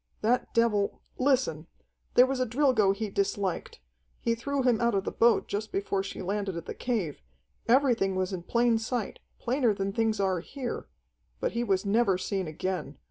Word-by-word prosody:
"That 240 +3 +1
devil 215 -4 +1 0.2
Listen: 255 - +1 0.5
there 250 - +8
was 265 0 -2
a 255 - +2
Drilgo 235 -5 +3
he 205 +1 -3
disliked. 195 - -2 0.4
He 230 - +1
threw 275 +4 -2
him 245 -3 +3
out 235 -2 +2
of 195 - +1
the - - -3
boat 235 0 +3
just 210 +2 -3
before 195 0 -1
she 195 - -6
landed 195 -1 -2
at 170 - -6
the - - -5
cave. 210 - -2 0.5
Everything 235 -6 +3
was 185 +1 -1
in 180 - -3
plain 235 +4 +2
sight, 225 -1 -3 0.2
plainer 245 -3 +1
than 195 0 -2
things 220 -1 +1
are 190 -2 +1
here. 250 - -5 0.5
But - - -1
he 235 +1 -1
was 195 -3 +1
never 200 -2 +3
seen 190 -1 -2
again. 185 +4 -4
215 Hz, 180 wpm, -28 LUFS, 195-240 Hz, 0.5 s, there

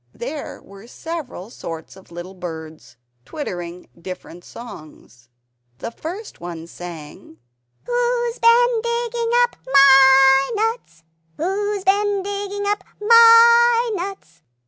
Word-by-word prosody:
There 275 +6 -7
were 200 +3 -15
several 265 - -8
sorts 165 -7 -9
of 190 -2 -18
little 175 +2 -9
birds, 160 -6 -10 0.3
twittering 180 - -7
different 180 -1 -10
songs. 155 - -13 0.5
The 230 - -7
first 360 - -9
one 170 -2 -8
sang 160 -2 -11 0.5
"Who's 485 -1 -1
bin 470 0 +3
digging 470 0 -3
up 485 - -3
MY 270 0 +6
nuts? 435 - -3 0.3
Who's 400 +4 -2
been 405 0 +1
digging 405 0 -5
up 405 -1 -1 0.2
MY 465 +1 +6
nuts?" 390 +1 -7
320 Hz, 105 wpm, -20 LUFS, -, 0.5 s, MY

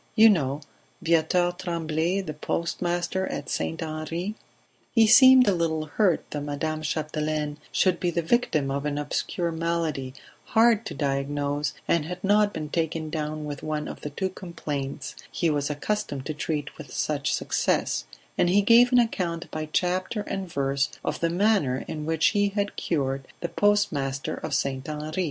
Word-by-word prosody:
You 220 -1 +8
know 145 -5 0 0.4
Viateur 170 +2 +3
Tremblay, 170 +1 -1
the 155 -5 -5
postmaster 175 +4 -1
at - - -5
St. 165 0 -2
Henri 160 +5 -4 0.3
..." - - -38
He 225 -1 +7
seemed 260 +2 +8
a 200 - +5
little 160 -3 0
hurt 180 +3 +1
that 145 - -3
Madame 150 +2 -3
Chapdelaine 155 -1 -2
should 185 -2 +2
be 175 - +1
the 170 0 -1
victim 160 - +1
of 140 +2 -1
an 145 -1 -2
obscure 165 +3 -2
malady, 160 -5 -2 0.3
hard 225 -1 +4
to - - -6
diagnose, 140 +1 -1
and 165 -3 +2
had 180 +2 -6
not 205 +1 +4
been 155 -4 -5
taken 160 -1 -2
down 155 -1 -3
with 145 -2 -5
one 155 -1 -3
of - - -8
the 150 - -4
two 190 +6 -2
complaints 145 -7 -5 0.2
he 170 -2 +1
was 145 -1 0
accustomed 150 -2 -2
to 155 - -3
treat 150 -1 -4
with 145 -4 -9
such 145 -1 -1
success, - - 0 0.3
and 175 - +4
he 200 +3 +4
gave 240 +4 +6
an 250 - +5
account 175 -8 0
by 155 -1 -4
chapter 185 +5 0
and 195 -3 -5
verse 140 -1 0 0.2
of - - -2
the 165 - +1
manner 175 -8 +2
in 155 -1 -5
which 160 -1 +3
he 205 -2 +2
had 200 0 -2
cured 135 -4 -1
the 170 - -2
postmaster 145 -10 +1
of - - -3
St. 135 0 -2
Henri. 155 +3 -4
160 Hz, 170 wpm, -26 LUFS, 150-185 Hz, 0.4 s, You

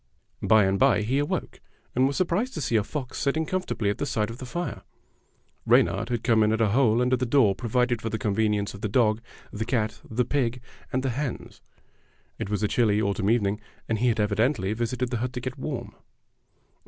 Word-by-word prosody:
By 110 -2 +5
and 95 0 +1
by 105 +3 +4
he 130 +6 +1
awoke, 145 - -3 0.3
and 130 +2 +3
was 140 - -2
surprised 190 +8 0
to 155 - -3
see 120 -3 0
a 105 - +3
fox 130 +3 -5
sitting 155 +3 0
comfortably 170 - -1
at - - -6
the 145 - -1
side 110 -4 -1
of 115 - -9
the 130 - -7
fire. 175 +6 -4 0.8
Reynard 115 +4 +3
had 120 -2 -2
come 115 -2 +3
in 105 0 +3
at 110 - 0
a 110 -2 +3
hole 120 0 +3
under 125 +1 +3
the 125 - -2
door 115 -6 +4
provided 120 +3 0
for 115 - -2
the 110 - -2
convenience 105 -1 0
of 100 - -10
the 105 - -2
dog, 110 0 +2 0.3
the 105 - -2
cat, 110 -2 -1
the 120 +2 0
pig, 125 -2 0 0.3
and 130 +1 0
the 135 - 0
hens. 135 +1 -5 0.8
It - - -3
was 105 0 -1
a - - +3
chilly 105 -2 +2
autumn 100 -1 0
evening, 105 -2 +1 0.3
and 110 -2 -1
he 125 - +2
had 115 -2 +1
evidently 105 0 +1
visited 120 +2 -2
the 120 - 0
hut 125 +2 -3
to 125 - -3
get 130 +2 -6
warm. 130 -4 -5
115 Hz, 215 wpm, -26 LUFS, 105-130 Hz, 0.8 s, By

